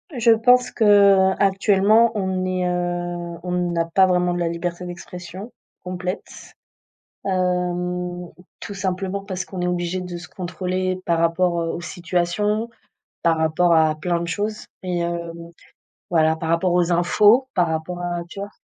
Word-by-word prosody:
je 235 -1 +4
pense 250 +2 +4
qu'actuellement, 200 +1 +4
on 190 -2 -1
est, 185 -1 -1
heu, 175 -1 -3
on 180 - -4 0.2
n'a 165 -1 0
pas 190 +3 +4
vraiment 180 -1 +1
de 175 - -2
la 170 - 0
liberté 175 +1 -4
d'expression 180 +4 -8 0.3
complète, 180 +1 -6 0.7
hem, 180 -1 -1 0.3
tout 205 - -7
simplement 190 +1 -3
parce 185 -3 -4
qu'on 185 -2 -6
est 180 - 0
obligé 180 +1 -1
de 180 -1 -6
se 170 -2 -10
contrôler 185 0 -3
par 170 -1 +1
rapport, 170 +1 +1
heu, 165 - -2
aux 175 - -5
situations, 180 +6 -1 0.5
par 165 -1 +3
rapport 165 +2 +2
à 160 -1 +4
plein 170 +1 -1
de 170 - -3
choses 210 +4 -3 0.2
et 175 -2 -1
heu, 170 0 -2 0.2
donc, 170 0 -11 0.6
voilà, 160 -2 +3
par 160 0 -4
rapport 175 +2 +2
aux 175 0 +2
infos, 210 +9 +4
par 175 -2 +2
rapport 160 +2 -3
à 175 -1 -2
tu 195 - -9
vois? 200 +1 -5
180 Hz, 160 wpm, -22 LUFS, 175-190 Hz, 0.7 s, je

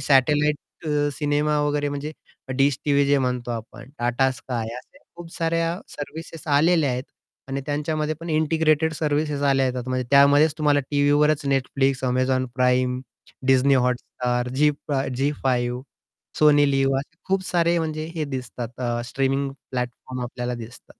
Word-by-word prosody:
Satellite 150 +2 +3 0.3
अ, 145 -1 +1
cinema 150 +2 0
वगैरे 145 0 0
म्हणजे 145 +2 -4 0.4
dish 135 -1 +3
TV 140 -1 +3
जे 140 0 +4
म्हणतो 125 -2 -2
आपण 115 +3 -7
टाटा 120 +2 +2
स्काय 120 -3 -5
अशा 130 - -13 0.2
खूप 170 -1 -10
साऱ्या 165 +1 0
सर्व्हिसेस 160 +2 -8
आलेल्या 150 0 +3
आहेत. 125 +1 -2 0.5
आणि 135 +1 -2
त्यांच्यामध्ये 150 +1 -1
पण 165 0 -5
इंटिग्रेटेड 155 0 +2
सर्व्हिसेस 150 -1 -1
आल्या 135 -1 +3
येतात 125 0 -3
म्हणजे 130 -1 -1
त्यामध्येच 145 +2 +6
तुम्हाला 145 -1 +3
टीव्हीवरच 145 +1 +3
Netflix, 135 0 +1
Amazon 130 0 +1
Prime, 125 0 +2 0.5
Disney 135 +1 +5
Hotstar, 125 0 -2
Zee 150 +2 +4 0.2
फा 135 -2 0
झी 135 +3 0
फाइव्ह, 125 -1 0 0.6
सोनी 145 -2 +5
लिव्ह 135 0 +2
असे 150 +4 -8
खूप 190 0 +1
सारे 170 -1 +2
म्हणजे 155 -1 -3
हे 155 -2 -1
दिसतात 125 -1 -7
अ, 120 -1 -1
स्ट्रीमिंग 135 +3 0 0.2
प्लॅटफॉर्म 125 0 -4
आपल्याला 125 0 -4
दिसतात. 120 +1 -10
140 Hz, 145 wpm, -23 LUFS, 125-150 Hz, 0.6 s, त्यामध्येच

